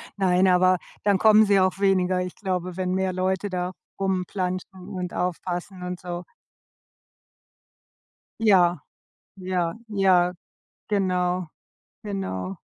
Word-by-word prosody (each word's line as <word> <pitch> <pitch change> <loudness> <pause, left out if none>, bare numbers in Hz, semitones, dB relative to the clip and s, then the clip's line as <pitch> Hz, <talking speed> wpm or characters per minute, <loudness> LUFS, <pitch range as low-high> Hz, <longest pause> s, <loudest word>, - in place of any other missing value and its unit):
Nein, 190 -1 +3
aber 185 0 +4 0.3
dann 205 -1 +3
kommen 215 +2 +6
sie 200 -1 +4
auch 185 0 +1
weniger. 185 -2 +2
Ich 180 -1 -5
glaube, 185 -2 -3
wenn 185 -1 -1
mehr 190 0 0
Leute 190 +2 -1
da 180 0 -2 0.3
rumplantschen 185 0 -3
und 180 -3 -4
aufpassen 180 +1 -3
und 180 0 -5
so. 175 0 -5 2.2
Ja. 180 -6 +4 0.6
Ja, 180 -3 -1
ja, 185 -4 +3 0.6
genau. 180 -3 0 0.6
Genau. 95 - -4
185 Hz, 110 wpm, -25 LUFS, 180-190 Hz, 2.2 s, kommen